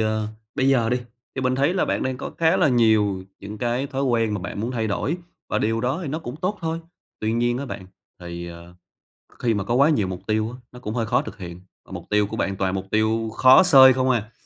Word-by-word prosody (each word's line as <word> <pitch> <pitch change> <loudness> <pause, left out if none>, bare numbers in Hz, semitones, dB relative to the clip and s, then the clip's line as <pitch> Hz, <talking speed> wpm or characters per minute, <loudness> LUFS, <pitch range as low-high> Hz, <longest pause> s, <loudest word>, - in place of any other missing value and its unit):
ờ, 110 -1 0 0.3
bây 135 -1 +1
giờ 120 -4 +3
đi, 125 - +2 0.4
thì 130 - -3
mình 130 0 +1
thấy 140 +7 +1
là 190 - +2
bạn - - -1
đang 130 -1 -2
có - - -6
khá 165 +3 +3
là 180 -6 +3
nhiều 110 -6 +3 0.2
những 105 +2 -8
cái 120 +4 -1
thói 135 0 -3
quen 115 -5 +1
mà 105 - -3
bạn 100 +2 -5
muốn 115 - -2
thay 115 -3 -1
đổi, 140 - -1 0.3
và - - 0
điều 115 +1 0
đó 130 +6 -1
thì 160 - -4
nó 155 +4 -2
cũng 130 -3 -7
tốt 185 +5 -2
thôi. 165 0 -2 0.4
Tuy 110 +1 0
nhiên 120 +1 +1
á 140 - -4
bạn, 95 -7 -7 0.3
thì, 85 0 -7
ờ, 85 +1 -12 0.6
kh - - -25
khi 115 -2 +1
mà 105 -2 -1
có 115 - -2
quá 140 +4 +5
nhiều 125 -12 +1
mục 90 -1 -7
tiêu 110 +1 0
á, 125 - -10
nó 125 - -12
cũng 105 -3 -5
hơi 115 -2 -1
khó - - +2
thực - - -9
hiện, 90 -1 -9 0.2
và - - -17
mục 90 -2 -7
tiêu 105 -1 +2
của 110 +2 -6
bạn 95 0 -1
toàn 95 0 0
là - - -1
mục - - -18
tiêu 110 +1 +1
khó 130 +8 +7
xơi 135 -7 +8
không 130 0 0
à. 115 -3 0
115 Hz, 270 wpm, -23 LUFS, 105-130 Hz, 0.6 s, xơi